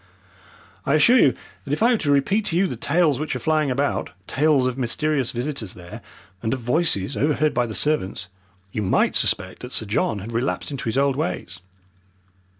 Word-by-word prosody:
I 140 - +2
assure 240 +12 +6
you 130 - +4 0.3
that 140 - -4
if 155 - 0
I 240 - +5
were 240 - +3
to 145 - 0
repeat 195 +10 +2
to 165 - -1
you 190 - +3
the - - -3
tales 155 -3 +1
which 155 -3 -3
are - - -3
flying 155 +2 +1
about, 140 +3 -1 0.2
tales 145 -1 +2
of 130 -1 -1
mysterious 135 +2 0
visitors 120 -4 -4
there, 85 -1 -10 0.4
and 110 +3 0
of - - -7
voices 125 - 0
overheard 150 +1 +1
by 120 -1 +1
the 110 - -5
servants, 100 -10 0 0.5
you 105 - -3
might 95 - +2
suspect 95 -1 0
that 125 - -8
Sir 110 - -1
John 105 +1 0
had 105 +4 -7
relapsed 120 +5 -2
into 140 - -5
his 115 +3 -1
old 140 -1 +2
ways." 90 - -3
135 Hz, 195 wpm, -23 LUFS, 115-155 Hz, 0.5 s, assure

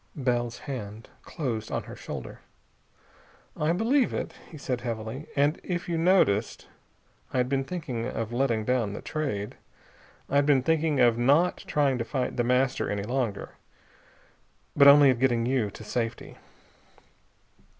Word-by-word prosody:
Bell's 120 -4 -1
hand 110 -6 -7
closed 115 -8 -4
on - - -2
her - - -10
shoulder. - - -8 1.2
"I 150 +2 0
believe 235 +9 +2
it," - - -4 0.2
he 160 - -10
said 125 -4 -3
heavily. 115 +3 -5
"And 145 +2 +2
if 175 -2 -3
you 170 - -1
noticed 165 - +2 0.7
I - - -2
had 125 0 +2
been 135 0 0
thinking 135 -8 -4
of 115 -2 -4
letting 120 -4 0
down 120 -5 0
the - - -7
Trade. 135 -10 -3 0.7
I'd 140 +1 +2
been 135 -3 +4
thinking 160 -1 +1
of 120 -2 +4
not 145 +9 +3
trying 140 -4 +1
to - - 0
fight 125 +1 -3
The 120 - +1
Master 125 +2 +1
any 100 -1 -2
longer, 120 -3 -2 1.2
but 140 -1 +7
only 140 -1 +8
of 120 - -2
getting 120 -3 +2
you 125 -4 0
to 110 - -11
safety. 115 +1 -4
130 Hz, 150 wpm, -27 LUFS, 115-145 Hz, 1.2 s, only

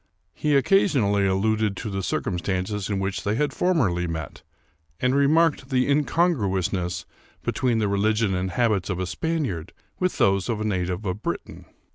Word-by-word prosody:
He 150 -1 +1
occasionally 130 - +3
alluded 105 +1 +1
to 110 - -4
the 95 0 -2
circumstances 95 +2 -2
in 100 - 0
which 95 0 -2
they 105 +1 0
had 145 +2 0
formerly 110 - +1
met, 80 -3 -5 0.6
and 125 +1 +2
remarked 140 0 +3
the 130 -2 +2
incon 155 +5 +3
gruousness 95 - -2 0.4
between 125 -3 0
the 110 -2 +1
religion 105 +1 +1
and 90 +1 -1
habits 105 -1 +1
of 95 - -1
a 95 - -1
Spaniard 130 - -3 0.3
with 185 0 0
those 100 +2 +2
of 115 -2 -1
a 110 - -2
native 90 -1 -2
of 95 +2 -3
Britain. - - -5
105 Hz, 160 wpm, -24 LUFS, 95-130 Hz, 0.6 s, occasionally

